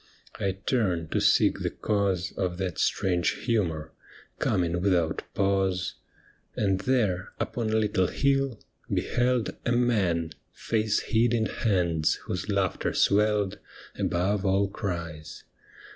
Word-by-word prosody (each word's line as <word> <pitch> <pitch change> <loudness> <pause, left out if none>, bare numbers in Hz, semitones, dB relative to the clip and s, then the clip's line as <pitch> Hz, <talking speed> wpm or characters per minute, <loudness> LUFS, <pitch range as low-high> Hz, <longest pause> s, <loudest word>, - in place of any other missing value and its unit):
I 95 -1 0
turned 95 - -1
to - - +1
seek - - +4
the - - -1
cause 100 -4 -1
Of 90 -2 -2
that 95 -4 -3
strange 90 -2 +1
humour 85 -10 -1 0.2
— - - -24
coming 85 -1 0
without 90 -4 +1
pause, 95 -2 +1 0.6
And 95 -3 +1
there, 105 -8 0
upon 115 -3 -2
a 110 - +1
little 105 -4 +2
hill, 135 -3 +1 0.3
beheld 125 -1 0
A - - 0
man, 95 -10 +1 0.2
face 110 -2 0
hid 115 +1 +2
in 110 -1 +1
hands, 85 -9 +1
whose 90 +3 -4
laughter 100 -4 0
swelled 105 -1 +2 0.4
Above 95 +3 0
all 100 0 +2
cries. 85 -6 -5
100 Hz, 125 wpm, -27 LUFS, 90-110 Hz, 0.6 s, seek